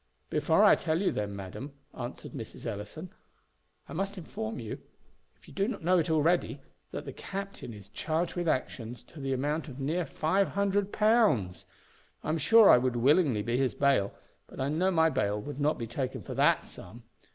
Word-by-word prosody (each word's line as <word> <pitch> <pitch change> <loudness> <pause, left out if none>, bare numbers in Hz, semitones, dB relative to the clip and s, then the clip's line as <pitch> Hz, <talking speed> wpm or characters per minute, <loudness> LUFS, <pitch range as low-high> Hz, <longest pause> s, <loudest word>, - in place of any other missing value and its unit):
"Before - - +3
I - - +8
tell 160 0 0
you 195 - +2
then, 100 -1 -3
madam," 100 +9 -7 0.2
answered 120 -1 -7
Mrs. 125 -7 -8
Ellison, 115 - -6 0.8
"I - - -9
must 195 +4 -3
inform 110 -10 -5
you, 115 -4 -6 0.6
if - - -23
you - - -13
do 195 +1 0
not 250 - -4 0.3
already 160 +3 +3
know - - -6
it, - - -24 0.3
that - - -6
the - - -6
captain 195 -9 -6
is 100 -3 -11
charged 160 +10 -2
with 175 -1 -2
actions 125 -4 -2
to 160 - -14
the 135 -1 -3
amount 145 +5 -1
of 135 -2 -9
near 160 +5 -1
five 190 +8 +1
hundred 200 0 0
pounds. 210 - +2 0.6
I - - -4
am 160 +1 +1
sure 220 +8 +7
I - - +8
would 125 -1 0
willingly 130 - +3
be 120 +3 0
his 130 -6 +1
bail; 135 -8 +2 0.4
but - - -12
I 135 +1 0
know 170 +6 +2
my 160 -3 +3
bail 105 -6 0
would 145 +6 -7
not 150 +2 +2
be 115 - -4
taken 125 +3 -4
for - - -6
that - - +3
sum. 115 +7 -11
145 Hz, 195 wpm, -29 LUFS, 120-175 Hz, 0.8 s, I